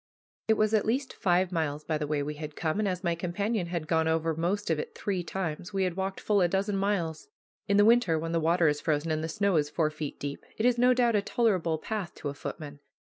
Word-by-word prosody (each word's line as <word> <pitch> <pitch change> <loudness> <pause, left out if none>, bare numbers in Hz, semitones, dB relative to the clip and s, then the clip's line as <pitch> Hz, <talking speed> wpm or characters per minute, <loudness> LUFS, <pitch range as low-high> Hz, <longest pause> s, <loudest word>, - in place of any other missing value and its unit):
It 220 - +4
was 215 0 +1
at 215 -1 +2
least 260 +4 0
five 180 0 +1
miles 155 -3 -1
by 155 -1 -1
the 150 - -2
way 145 -1 0
we 150 +1 -3
had 150 0 -7
come, 160 +4 -1
and 215 - +1
as 180 0 -2
my 170 -2 +1
companion 180 +3 -2
had 170 -2 -3
gone 160 0 +2
over 160 0 +1
most 180 +4 -1
of 155 - +1
it - - -6
three 190 -3 -2
times 175 -2 -4
he 195 -1 0
had 180 -2 -1
walked 190 0 -3
full 205 -2 +2
a 175 - +4
dozen 195 +3 0
miles. 195 - -1 0.4
In 200 - +3
the 205 - +6
winter, 225 -8 +4
when 165 +1 -3
the 165 - +1
water 165 +1 +3
is 145 0 +1
frozen 155 0 0
and 155 0 -1
the 160 - -3
snow 200 +1 +1
is 145 -1 +1
four 155 0 0
feet 155 -2 -6
deep, 140 0 -5
it 220 - 0
is 245 -1 +3
no 250 +1 +5
doubt 240 -2 +3
a 205 - +3
tolerable 190 -8 +1
path 200 +1 -4
to 145 - -4
a - - -4
footman. 145 0 -7
175 Hz, 260 wpm, -29 LUFS, 155-200 Hz, 0.4 s, the